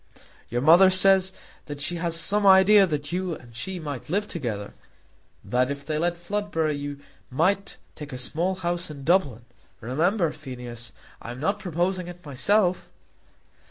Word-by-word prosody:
"Your 120 +2 -2
mother 175 +5 +7
says 190 0 +4 0.4
that 145 -1 -7
she 175 +4 -1
has 165 -1 0
some 205 +4 +1
idea 195 +1 +7
that 150 -2 -4
you 180 -1 -2
and 120 -4 -15
she 180 +10 -5
might 145 -5 -6
live 205 +5 0
together; 110 - -5 0.7
that 125 +1 +1
if 140 0 -5
they 155 -1 -2
let 175 +1 0
Floodborough 175 -4 -2
you 145 0 -6 0.3
might 185 +9 0 0.2
take 150 -1 -9
a 130 - -5
small 165 +9 -1
house 175 -1 -3
in 145 -2 -9
Dublin. 140 - +1 0.3
Remember, 165 - 0
Phineas, 120 -3 -8 0.3
I - - -8
am 120 +1 -7
not 200 +8 -1
proposing 180 0 -2
it 175 -1 -11
myself." 180 - +1
165 Hz, 160 wpm, -25 LUFS, 140-185 Hz, 0.7 s, mother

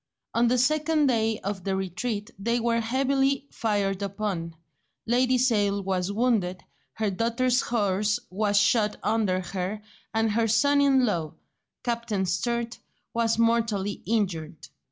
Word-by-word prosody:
On 235 +1 +3
the 250 +2 +2
second 305 +4 +2
day 225 -4 +1
of 195 -2 -4
the 195 0 -1
retreat 205 +3 -3
they 235 +4 0
were 230 0 +1
heavily 270 +3 +1
fired 205 -3 -1
upon, 195 -4 -3 0.5
Lady 255 +2 +2
Sale 205 -5 +2
was 190 0 -1
wounded, 205 -5 0 0.3
her 215 -2 -1
daughter's 235 +5 +1
horse 210 -1 0
was 205 +1 +1
shot 210 0 +2
under 200 -5 +1
her, 190 +3 -4 0.3
and 225 0 +1
her 225 +1 +1
son 285 +6 +3
in 270 -2 +4
law, 165 -8 -2 0.5
Captain 235 -5 -1
Sturt, 235 +6 -2 0.3
was 230 -1 +1
mortally 230 -4 +1
injured. 175 -8 -2
220 Hz, 135 wpm, -26 LUFS, 195-240 Hz, 0.5 s, in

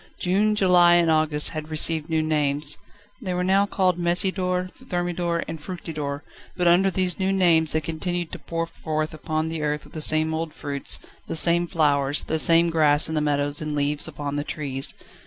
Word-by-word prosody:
June, 205 +4 +1
July, 180 -3 +5
and 170 -2 +3
August 155 -1 +2
had 155 -1 -6
received 160 0 +1
new 160 -1 0
names 150 -1 +2 0.5
they 185 -5 -3
were 180 - -1
now 195 +2 +2
called 185 -3 0
Messidor, 180 +1 0
Thermidor, 175 -7 -3
and 165 -2 -7
Fructidor, 150 -5 -6 0.3
but 180 -1 +1
under 180 +3 +4
these 185 -1 0
new 190 0 0
names 170 -5 +3
they 160 - 0
continued 170 +2 -4
to - - -7
pour 165 0 -4
forth 155 -2 -4
upon 155 0 -3
the 160 -1 -4
earth 150 0 -3
the 155 - -7
same 155 +1 +3
old 160 0 -4
fruits, 140 -1 -3 0.3
the - - -4
same 170 +1 +4
flowers, 145 -3 +2
the 160 - -2
same 170 +1 +5
grass 155 -1 +3
in - - -4
the 155 - 0
meadows 145 0 -1
and 150 -1 -4
leaves 145 +1 0
upon 145 -2 -5
the 145 - -2
trees. 140 -4 -4
160 Hz, 185 wpm, -23 LUFS, 150-175 Hz, 0.5 s, July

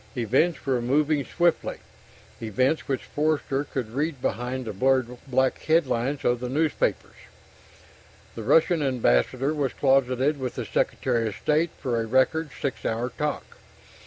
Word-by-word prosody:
Events 135 +9 +1
were 130 -3 +1
moving 145 +4 +1
swiftly 175 +2 0 0.6
events 130 +8 0
which 135 -2 -2
Forster 145 -2 -1
could 125 -6 -4
read 145 +2 -2
behind 125 +3 -3
the 110 - -4
blurred 130 +3 +1
black 130 0 +1
headlines 145 -4 0
of 120 0 +2
the 125 0 -4
newspapers. 155 +4 0 1.2
The 115 - -7
Russian 160 +7 +3
ambassador 130 - +1
was 145 -4 -1
closeted 135 +1 +2
with 130 -2 -4
the - - -4
Secretary 120 -3 0
of 105 - -4
State 155 +7 +1
for 120 -4 -1
a 115 - -4
record 130 +6 +2
six 130 -6 -3
hour 115 +3 -1
talk. 150 -1 -4
130 Hz, 140 wpm, -25 LUFS, 120-150 Hz, 1.2 s, Russian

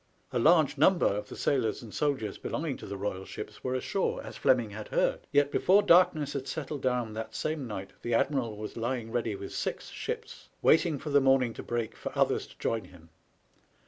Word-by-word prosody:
A 125 - 0
large 155 0 +4
number 180 +4 +5
of 105 +1 0
the - - -7
sailors 125 -5 0
and 110 - -10
soldiers 135 -9 -1
belonging 155 -3 -3
to - - -9
the 100 0 -5
Royal 95 -1 -3
ships - - -8
were 130 0 -1
ashore, 185 +9 -1
as - - -8
Fleming 120 -5 +2
had 105 +1 -7
heard; - - 0
yet 145 0 +3
before 200 +3 +4
darkness 170 -6 +4
had 140 -1 -4
settled 150 -2 -4
down 125 -4 0
that 110 +1 -6
same 155 -4 -2
night 100 -3 -6
the 120 -1 0
admiral 120 -4 0
was 105 0 -6
lying 115 -1 -3
ready 115 -3 -1
with 100 0 -7
six - - -3
ships, - - -6
waiting 160 -1 +4
for 150 +2 -6
the 140 0 +5
morning 135 -3 +3
to - - -7
break 120 -2 -3
for - - -6
others - - +2
to - - -17
join 115 -1 -1
him. 85 -2 -17
125 Hz, 205 wpm, -29 LUFS, 110-145 Hz, -, number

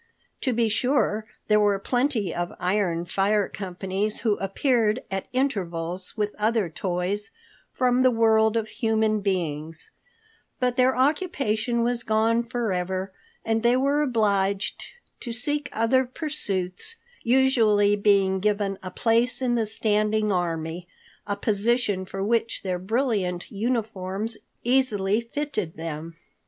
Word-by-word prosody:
To 260 - +1
be 235 -1 +2
sure, 220 -2 +1 0.2
there 210 -1 +4
were 205 -1 +3
plenty 245 - 0
of 175 0 -3
iron 180 -2 0
fire 200 +3 +1
companies 195 +2 -3
who 215 -3 +2
appeared 220 +3 +1
at 195 0 -3
intervals 185 -9 -2
with 210 -1 -1
other 215 -3 +1
toys 185 +4 -2 0.4
from 250 0 +2
the 255 - +6
world 220 -1 +3
of 220 -1 -1
human 220 -1 +1
beings, 165 -5 -3 0.7
but 250 -1 +1
their 255 0 +3
occupation 255 - +1
was 240 0 +1
gone 225 +1 +2
forever, 190 -6 -2 0.3
and 225 0 +1
they 240 +2 +4
were 280 +3 +2
obliged 200 -6 0 0.4
to 240 - -6
seek 290 +5 -1
other 230 +4 +2
pursuits, 250 - -3 0.3
usually 230 -5 +4
being 200 -2 +3
given 200 -1 0
a 185 - -6
place 230 +5 +1
in 255 -2 0
the 230 -2 +1
standing 215 0 +1
army, 170 -1 -2 0.4
a 205 - -1
position 205 -1 +1
for 195 +1 -4
which 230 +2 0
their 185 -2 -2
brilliant 195 -4 -1
uniforms 215 -1 -2 0.3
easily 225 -5 +2
fitted 230 - -4
them. 165 0 -6
215 Hz, 125 wpm, -25 LUFS, 190-240 Hz, 0.7 s, the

